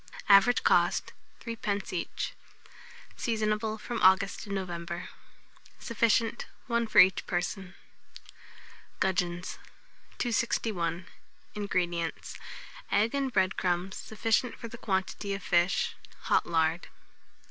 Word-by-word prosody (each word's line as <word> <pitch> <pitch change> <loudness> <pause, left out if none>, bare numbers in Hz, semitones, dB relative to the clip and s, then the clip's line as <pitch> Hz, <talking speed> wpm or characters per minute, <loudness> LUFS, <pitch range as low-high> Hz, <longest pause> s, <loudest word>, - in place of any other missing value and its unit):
Average 200 +4 +6
cost, - - +2 0.3
3d. 210 -5 -3
each. 170 - -3 0.8
Seasonable 215 -1 -1
from 240 +2 -4
August 190 +1 +4
to - - -9
November. 175 -3 -4 0.7
Sufficient, 230 +2 +1 0.2
1 235 -2 0
for - - -3
each 185 0 +6
person. 180 +1 -3 1.2
GUDGEONS. 180 -2 -1 0.6
261. 195 -7 -1 0.5
INGREDIENTS. 175 -5 -2 0.5
Egg 215 +3 +2
and 275 -2 0
bread 190 -3 +2
crumbs 180 +1 -1
sufficient 225 +2 0
for 230 - -7
the 235 +1 -10
quantity 195 0 -2
of 195 - -8
fish; 175 +1 +2 0.3
hot - - +2
lard. 165 0 +1
195 Hz, 100 wpm, -29 LUFS, 180-225 Hz, 1.2 s, Average